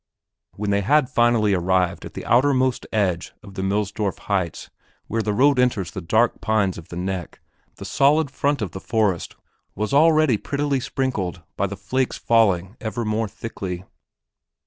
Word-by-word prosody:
When 105 0 -2
they 100 0 +2
had 130 +6 +2
finally 120 -3 +3
arrived 90 0 +1
at - - -10
the - - -6
outermost 130 0 +2
edge 95 -5 0
of 100 - -12
the 95 - -4
Millsdorf 100 +1 -1
heights 95 -5 -3 0.3
where 115 +1 -1
the 105 0 -1
road 135 +5 +4
enters 120 -8 +1
the 95 - -6
dark 110 +8 +1
pines 105 -5 +1
of 80 - -13
the - - -9
"neck" 90 -1 -4 0.4
the - - -9
solid 145 +1 +3
front 140 -3 0
of 95 - -4
the 95 - -7
forest 105 -7 0 0.4
was 105 +5 -2
already 155 -4 +5
prettily 140 -1 -1
sprinkled 105 -10 -3
by 100 - 0
the 100 +1 -7
flakes 130 +6 -1
falling 100 -3 +2
ever 115 0 -3
more 110 +1 0
thickly. 95 -4 -6
110 Hz, 165 wpm, -22 LUFS, 95-130 Hz, 0.4 s, already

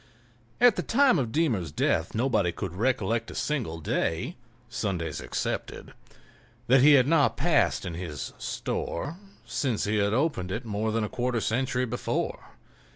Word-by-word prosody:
At 245 -3 +6
the - - +1
time 260 - +4
of 120 -4 -2
Deemer's 115 - 0
death 80 +3 0
nobody 110 -7 +2
could 90 0 -5
recollect 115 +1 0
a - - -9
single 120 - -2
day, 80 - -1 0.3
Sundays 95 - -3
excepted, - - -4 0.7
that 125 +2 +5
he 150 +2 +8
had 130 -3 +6
not 150 0 +3
passed - - +2
in 85 - -4
his 80 -5 -6
"store," 145 - -3 0.3
since 125 -7 -1
he 105 +1 0
had 100 0 +2
opened 115 - 0
it 115 +5 -4
more 110 0 -1
than 115 0 0
a - - -1
quarter 120 +1 -1
century 125 +3 0
before. 125 0 -3
115 Hz, 155 wpm, -27 LUFS, 95-135 Hz, 0.7 s, he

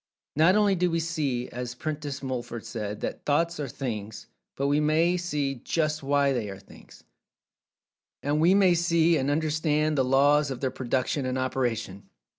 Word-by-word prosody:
Not 165 +6 +5
only 205 -2 +4
do 180 -1 +1
we 165 0 0
see, 150 -7 -2
as 125 0 -6
Prentice 145 -1 -5
Mulford 120 -3 -5
said, 105 -2 -5
that - - -4
"Thoughts 165 +3 +1
are 145 - -2
Things," 110 -5 -5 0.3
but 140 - -2
we 145 +1 +2
may 160 +4 +2
see 150 -6 -1
"just 155 -1 -1
why" 140 0 +2
they 115 -5 -2
are 95 - -7
Things. - - -17 1.2
And 145 +2 +1
we 175 +4 +5
may 190 -3 +5
see 170 -1 +3
and 135 -2 0
understand 155 0 +1
the - - +4
laws 145 +3 +3
of 130 -2 -5
their 130 -1 -1
production 130 +2 -1
and 130 0 -2
operation. 120 -7 -2
145 Hz, 170 wpm, -27 LUFS, 130-160 Hz, 1.2 s, Not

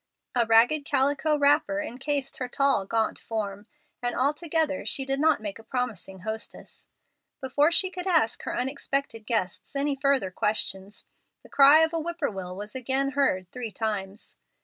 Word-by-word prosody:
A 235 -2 +1
ragged 235 +7 +4
calico 285 +2 +1
wrapper 295 +1 +2
incased 280 0 -3
her 255 - -3
tall, 270 -6 +1
gaunt 225 0 0
form, 205 -2 -5 0.3
and 245 0 -1
altogether 300 +2 0
she 270 - 0
did 270 0 -1
not 320 +2 +3
make 205 +1 -5
a - - -13
promising 220 -6 -4
hostess. 220 +2 -7 0.5
Before 285 +4 +2
she 370 +2 +3
could 360 0 -6
ask 320 -11 +2
her - - -4
unexpected 265 -3 -2
guests 220 +2 -2
any 280 0 0
further 270 -8 +1
questions, 200 0 -2 0.4
the - - -16
cry 285 +3 +7
of 320 +1 +2
a 330 - 0
whippoorwill 250 - -4
was 210 +2 -8
again 265 +2 0
heard 185 -11 0
three 245 -3 -5
times. 205 -1 -5
265 Hz, 155 wpm, -26 LUFS, 220-290 Hz, 0.5 s, cry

